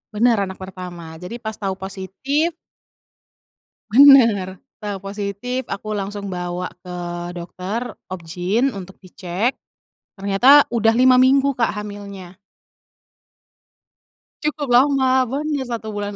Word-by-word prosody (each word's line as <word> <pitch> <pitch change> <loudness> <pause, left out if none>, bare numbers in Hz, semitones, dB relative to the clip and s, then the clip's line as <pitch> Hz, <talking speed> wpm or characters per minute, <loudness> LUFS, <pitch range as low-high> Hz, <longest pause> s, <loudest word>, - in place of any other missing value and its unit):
Bener, 230 +1 +3
anak 190 -1 -4
pertama. 180 -3 -9
Jadi 190 +7 -6
pas 220 -2 -5
tahu 195 -2 -4
positif 195 - -2 1.4
Bener, 230 -7 +6 0.2
tau 205 -3 -5
positif 205 +6 -4
aku 210 +2 -4
langsung 200 0 -5
bawa 180 0 -4
ke 180 0 -9 0.4
dokter 185 +7 -5 0.2
obgyn 185 +8 -1
untuk 190 -5 -10
dicek, 185 +6 -3 0.6
ternyata 240 +9 +6
udah 225 -2 +2
5 255 0 +6
minggu 270 +2 +4
Kak 230 -4 +1
hamilnya. 200 -3 -8 2.1
Cukup 300 -1 -2
lama, 270 +2 +4 0.2
bon 275 +5 -3 0.2
ya - - -2
1 230 -2 -5
bulan 205 0 -4
205 Hz, 110 wpm, -20 LUFS, 190-245 Hz, 2.1 s, Bener